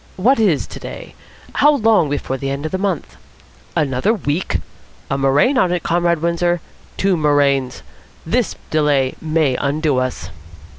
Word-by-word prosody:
What 230 +8 +3
is 190 -10 +2
today? - - -9 0.4
How 295 0 +4
long 215 - +3
before 140 -2 -2
the 135 +1 -4
end 140 +2 -4
of 155 - -3
the 190 - -2
month? 185 - -3 0.6
Another 140 - +1
week! 165 -2 -1 0.5
A - - +2
murrain 140 - +3
on 180 -5 +2
it, 180 -2 -1
Comrade 170 -1 +1
Windsor. 175 +1 +1 0.4
Two 195 -1 +2
murrains. 140 -4 +1 0.4
This - - 0 0.2
delay 145 -4 +2
may 155 -4 +1
undo 145 -1 0
us." 130 0 -3
155 Hz, 145 wpm, -18 LUFS, 140-180 Hz, 0.6 s, How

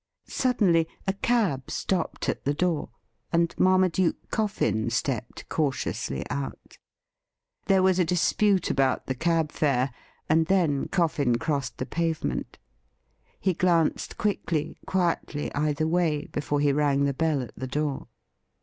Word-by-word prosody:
Suddenly 195 -11 +2 0.2
a 195 - +1
cab 200 - 0
stopped 185 -4 -2
at - - -2
the 145 +1 0
door, 170 -2 0 0.4
and 170 0 +2
Marmaduke 185 -1 +2
Coffin 120 - 0
stepped 120 0 -3
cautiously 135 - -2
out. 70 -1 -6 0.9
There 190 -1 +4
was 190 -1 +3
a - - +5
dispute 185 +3 +2
about 135 -2 +1
the 130 - -1
cab 160 +2 0
fare, 135 -3 +1 0.3
and 160 +1 +3
then 170 -8 +2
Coffin 150 -9 +1
crossed 140 -2 -2
the 130 - -3
pavement. 165 +2 -2 0.8
He 190 - +1
glanced 170 -2 +1
quickly, 170 -7 -1
quietly, 170 -5 -1
either 150 +1 0
way 160 -3 +1
before 145 0 -1
he 145 -1 +3
rang 140 -1 +2
the 140 0 +1
bell 150 -1 0
at 120 - -11
the 130 - -5
door. 145 +1 -2
155 Hz, 130 wpm, -26 LUFS, 140-180 Hz, 0.9 s, a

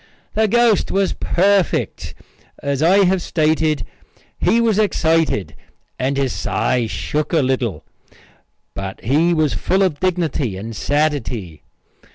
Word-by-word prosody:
The 220 0 +2
ghost 235 -1 +3
was 195 0 +1
perfect. 195 +1 0 0.5
As 140 0 -1
I 190 +5 +5
have 185 0 +1
stated, 155 -5 0 0.5
he 230 - +3
was 225 -3 +2
excited 165 - +1 0.5
and 135 +2 -1
his 135 -2 0
sigh 125 -3 -1
shook 150 +6 -3
a 160 -4 +3
little, 125 -10 -1 0.9
but 95 -1 -6
he 150 - +2
was 155 -3 +1
full 190 +1 +1
of 170 -6 0
dignity 165 - -1
and 110 +3 -7
sadity. 125 - -2
155 Hz, 125 wpm, -19 LUFS, 130-185 Hz, 0.9 s, I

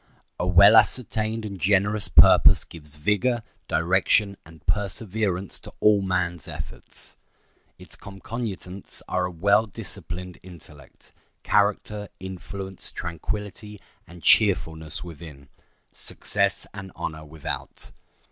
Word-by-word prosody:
A 90 - 0
well 100 +4 +8
ascertained 110 -1 +2
and 100 -4 -7
generous 100 +2 +2
purpose - - +7
gives 75 -2 -10
vigor, 105 +8 +1 0.2
direction, 95 +5 +2
and 80 -1 -16
perseverance 100 0 -1
to - - -11
all 105 -1 +5
man's 90 -4 -1
efforts. - - -6 0.6
Its - - -10
concomitants 100 -1 -6
are 90 0 0
a 90 - -4
well 100 +6 +3
disciplined 90 -2 -6
intellect, 80 -6 -15 0.3
character, 105 0 +1
influence, 95 +1 -7
tranquillity, 105 +4 -5 0.3
and 85 0 -13
cheerfulness 80 -7 +2
within—success 85 +5 -5
and 100 -2 -8
honor 80 -1 -5
without. 75 0 -6
95 Hz, 100 wpm, -25 LUFS, 85-105 Hz, 0.6 s, well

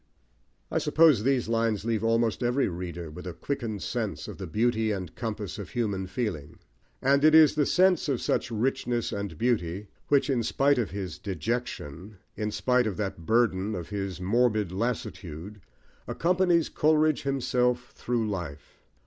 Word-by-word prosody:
I - - +1
suppose 155 -8 +4
these 130 0 +1
lines 115 -2 0
leave 115 -2 0
almost 115 0 +1
every 125 +3 +2
reader 85 -2 -5
with 90 +4 -9
a 85 - -6
quickened 115 - -4
sense - - -3
of - - -8
the - - -5
beauty 110 +5 +1
and 95 -5 -4
compass 110 -3 -5
of 100 - -7
human 100 -6 -2
feeling; 90 - -4 0.5
and 140 +2 +3
it 155 0 +7
is 160 -2 +8
the 150 -2 +1
sense 180 -4 +3
of 130 -4 +1
such - - 0
richness 120 0 -1
and 100 -5 -4
beauty 100 -4 -1 0.2
which, 140 -1 +3
in 130 -4 +1
spite 140 +4 +2
of 110 -6 -1
his 95 -2 -5
"dejection," 100 -4 -4 0.2
in 105 -1 -2
spite 125 +2 +1
of 100 - -3
that 95 -6 -4
burden 110 -3 +2
of 85 -3 -6
his 95 -3 -4
morbid 105 0 +1
lassitude, 100 -3 -4 0.5
accompanies 175 -1 +2
Coleridge 155 0 +2
himself 125 -2 0
through 120 -2 -2
life. 90 -8 -6
115 Hz, 155 wpm, -27 LUFS, 95-125 Hz, 0.5 s, is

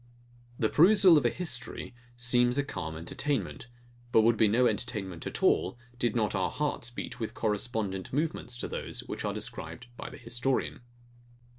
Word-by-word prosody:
The 110 - +2
perusal 185 - +7
of 150 - +4
a - - +3
history 130 -6 -4 0.2
seems 120 +1 +4
a 140 - +3
calm 80 - -5
entertainment; 115 - -2 0.4
but 110 - +6
would 115 +1 +4
be 110 0 +4
no 120 +5 +4
entertainment 105 -10 -1
at - - -4
all, 95 +6 +3 0.2
did 120 -2 +1
not 110 -3 +1
our 95 -2 +1
hearts 145 -5 -2
beat 120 - -6
with 110 - -4
correspondent 105 -3 -2
movements 145 -4 -2
to - - -3
those - - -4
which - - -6
are - - -1
described 80 +9 -5
by - - -6
the - - -10
historian. 120 +3 -1
120 Hz, 165 wpm, -30 LUFS, 105-130 Hz, 0.4 s, perusal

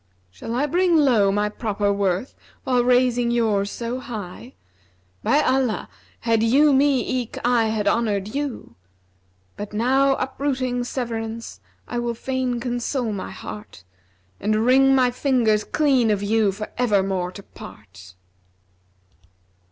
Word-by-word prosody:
Shall 225 - -6
I 270 +4 +1
bring 345 +2 +2
low 235 -10 +4
my 205 +1 +1
proper 205 -2 -1
worth 200 +3 -1 0.3
while 250 -2 +2
raising 245 -1 +2
yours 215 -4 +1
so 235 +3 -4
high? 230 -1 -8 0.3
* 90 0 -39
By 295 - +3
Allah 260 -4 0 0.3
had 225 -1 +1
you 275 +6 +4
me 270 -1 +3 0.2
eke 235 - -9
I 240 -2 +3
had 220 -2 -1
honoured 210 -3 0
you! 285 -3 -4 0.8
But 205 0 -7
now 265 +5 +2
uprooting 260 -2 -2
severance 230 -2 -5 0.3
I 240 - -3
will 240 0 -2
fain 255 0 -2
console 245 -1 -2
my 195 - -5
heart, 210 - -9 0.3
* 90 +1 -39
And 215 +2 +1
wring 270 +2 +5
my 250 -2 +3
fingers 240 -5 +1
clean 270 -7 +2
of 205 -1 0
you 215 0 +2
for 215 +2 -7
evermore 195 -6 +1
to 200 - -10
part!' 95 - -13
235 Hz, 135 wpm, -22 LUFS, 205-255 Hz, 0.8 s, wring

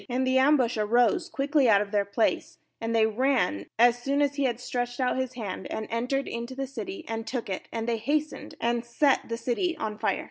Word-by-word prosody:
19And 255 +1 0
the 260 0 +3
ambush 260 -4 +3
arose 245 - +2
quickly 280 -3 +2
out 205 -2 +6
of 200 0 -3
their 205 -1 +1
place, 200 +3 0 0.2
and 225 0 -1
they 220 -1 +5
ran 220 - +1
as 240 +1 +4
soon 275 +3 0
as 285 -1 +1
he 280 -1 0
had 240 -2 -1
stretched 245 0 -3
out 255 -1 +1
his 260 -1 -3
hand, 200 -6 -5
and 220 - -3
entered 250 +4 -1
into 235 +2 -5
the 270 +1 -2
city, 320 - -7
and 225 0 -4
took 240 -6 -3
it; 185 - -4
and 225 0 -3
they 235 -1 +1
hastened 295 +6 -2
and 235 0 0
set 255 +3 +1
the 230 - -2
city 290 +9 -1
on 215 -7 -4
fire. - - 0
245 Hz, 220 wpm, -27 LUFS, 225-275 Hz, 0.2 s, out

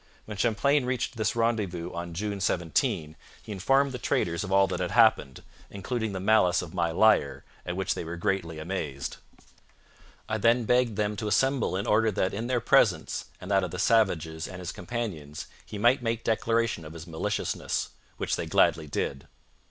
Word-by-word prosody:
When 105 - -7
Champlain 125 +6 +2
reached 130 0 -2
this 110 -1 -1
rendezvous 105 -7 -1
on 85 0 -6
June 100 +1 -3
17, 80 -3 0 0.3
he 110 - -9
informed 135 +8 +2
the 125 - -5
traders 85 -6 0
of 95 - -6
all 95 0 +5
that 95 - -3
had 90 -1 -1
happened, 110 - +3 0.3
including 110 +2 -3
the 95 - -4
malice 95 -3 +3
of 85 - -9
my 85 -1 0
liar, 85 -5 +3 0.2
at 90 - -2
which 95 0 0
they - - -5
were 85 +1 -5
greatly 85 -4 -1
amazed. 80 -5 -4 1.1
I 110 0 -2
then 115 +3 +3
begged 125 -2 +2
them 105 0 0
to 105 - -3
assemble 135 +1 +1
in 100 - -3
order 110 +1 +3
that 95 - 0
in 110 +4 -3
their 125 -1 +1
presence, - - +2
and 95 - -7
that 95 -1 +3
of 90 - -2
the 90 - -6
savages 85 -7 +1
and 95 - -8
his 90 -1 -5
companions, 85 -12 -5 0.2
he 105 - -7
might 120 +6 +3
make 115 -1 -2
declaration 115 -4 0
of 80 0 -9
his 85 -1 -9
maliciousness; 80 -2 -2 0.3
which - - -1
they - - -4
gladly 80 -1 +3
did. 70 -1 -3
100 Hz, 185 wpm, -27 LUFS, 85-115 Hz, 1.1 s, all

